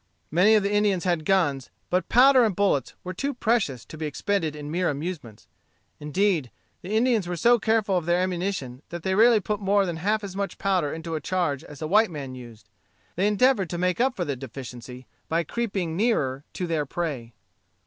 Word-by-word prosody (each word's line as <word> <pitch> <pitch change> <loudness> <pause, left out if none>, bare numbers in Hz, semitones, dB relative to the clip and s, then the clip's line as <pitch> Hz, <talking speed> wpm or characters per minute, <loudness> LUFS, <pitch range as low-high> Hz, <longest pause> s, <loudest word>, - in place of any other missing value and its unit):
Many 190 +7 +5
of 210 - +3
the 200 - 0
Indians 205 -4 +2
had 175 -4 0
guns, 145 -9 +1 0.2
but 180 0 0
powder 260 +1 +6
and 215 -5 +1
bullets 195 -10 +1
were 185 - -5
too 275 +9 -3
precious 210 - 0
to 155 - -11
be 155 - -2
expended 160 +1 -1
in 150 0 -7
mere 180 +2 +1
amusements. 145 - -6 0.5
Indeed, 155 -2 0 0.3
the 180 - -9
Indians 230 -5 +2
were 175 - -2
so 235 +7 +4
careful 220 -4 +1
of 170 -2 -3
their 175 0 +3
ammunition, 180 -8 -2
that 170 -1 -7
they 190 - 0
rarely 225 +2 +5
put 210 +1 -3
more 200 0 +2
than 170 -3 -3
half 210 +5 0
as 195 -2 -6
much 200 0 -3
powder 185 -7 0
into 165 +1 -6
a 155 - -2
charge 160 -4 -1
as 145 0 -10
a - - -2
white 215 +6 +4
man 140 -5 -6
used. 120 -4 -12 0.5
They 190 +4 +2
endeavored 210 -3 +3
to 175 - -4
make 180 +4 0
up 260 0 +2
for 175 - -2
the 140 - -2
deficiency 125 -1 -9 0.2
by 165 +1 +1
creeping 195 -4 -3
nearer 145 - 0
to 180 - -3
their 160 -4 -1
prey. 135 -9 -4
180 Hz, 200 wpm, -25 LUFS, 150-205 Hz, 0.5 s, powder